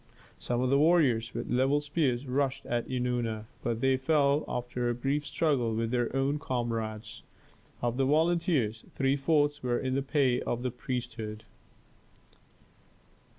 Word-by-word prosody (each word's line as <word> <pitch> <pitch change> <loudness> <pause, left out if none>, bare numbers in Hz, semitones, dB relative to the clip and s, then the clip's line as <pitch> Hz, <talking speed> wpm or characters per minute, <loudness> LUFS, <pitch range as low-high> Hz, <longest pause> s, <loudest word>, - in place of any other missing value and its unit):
Some 120 0 -1
of 130 0 +1
the 140 - +4
warriors 145 -8 +3
with - - -4
levelled 135 +4 +2
spears 145 -4 0
rushed 135 +1 -1
at 120 -1 -2
Eunana, 120 -4 -1 0.2
but 115 -1 -2
they 135 0 +3
fell 145 +1 +2
after 125 0 -2
a 120 - 0
brief 140 +4 -1
struggle 135 -8 0
with 115 0 -1
their 120 -2 0
own 135 +2 +1
comrades. 115 -5 -3 0.6
Of 120 0 0
the 135 - +2
volunteers, 155 - +1
three 135 0 +1
fourths 145 0 +1
were 120 -1 0
in 130 -1 -2
the 135 - +1
pay 135 -3 +1
of 120 +1 -2
the 125 - -1
priesthood. 120 -4 -5
130 Hz, 150 wpm, -29 LUFS, 120-145 Hz, 0.6 s, the